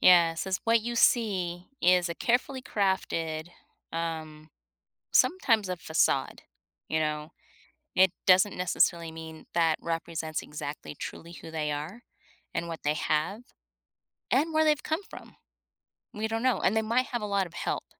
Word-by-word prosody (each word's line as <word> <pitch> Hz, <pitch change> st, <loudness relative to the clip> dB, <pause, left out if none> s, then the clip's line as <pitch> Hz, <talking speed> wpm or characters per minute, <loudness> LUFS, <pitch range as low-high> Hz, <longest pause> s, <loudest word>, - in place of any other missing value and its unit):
Yeah, 170 Hz, -2 st, +7 dB
since 190 Hz, +3 st, -2 dB
what 230 Hz, -1 st, +4 dB
you 235 Hz, 0 st, -3 dB
see 185 Hz, -8 st, +2 dB
is 180 Hz, 0 st, +4 dB
a 170 Hz, -, -3 dB
carefully 255 Hz, +5 st, 0 dB
crafted, 165 Hz, -5 st, -1 dB, 0.4 s
um 155 Hz, -2 st, -4 dB, 0.6 s
sometimes 225 Hz, -, +3 dB
a 180 Hz, -, -1 dB
facade, 160 Hz, -2 st, 0 dB, 0.4 s
you 160 Hz, -, 0 dB
know? 150 Hz, +1 st, -2 dB, 0.7 s
It 190 Hz, -1 st, +6 dB
doesn't 185 Hz, +2 st, +5 dB
necessarily 170 Hz, -2 st, +1 dB
mean 160 Hz, -1 st, -10 dB
that 165 Hz, -2 st, +3 dB
represents 165 Hz, -1 st, -3 dB
exactly 150 Hz, 0 st, -6 dB
truly 170 Hz, +3 st, -8 dB
who 165 Hz, -, -10 dB
they 155 Hz, -2 st, -2 dB
are 160 Hz, +11 st, -5 dB, 0.5 s
and 170 Hz, 0 st, -2 dB
what 165 Hz, -, -5 dB
they 150 Hz, -, +2 dB
have 155 Hz, +10 st, -1 dB, 0.9 s
and 310 Hz, +5 st, +2 dB
where 315 Hz, 0 st, +4 dB
they've 300 Hz, -2 st, +3 dB
come 315 Hz, +6 st, -1 dB
from. -, -, -12 dB, 0.8 s
We 220 Hz, +1 st, -2 dB
don't 225 Hz, +2 st, -2 dB
know, 255 Hz, -1 st, +3 dB
and 200 Hz, -, +2 dB
they 220 Hz, -, +3 dB
might 235 Hz, +4 st, +1 dB
have 240 Hz, -3 st, -3 dB
a -, -, -2 dB
lot 200 Hz, -2 st, 0 dB
of 170 Hz, -, -18 dB
help 175 Hz, -, -3 dB
175 Hz, 155 wpm, -28 LUFS, 160-220 Hz, 0.9 s, Yeah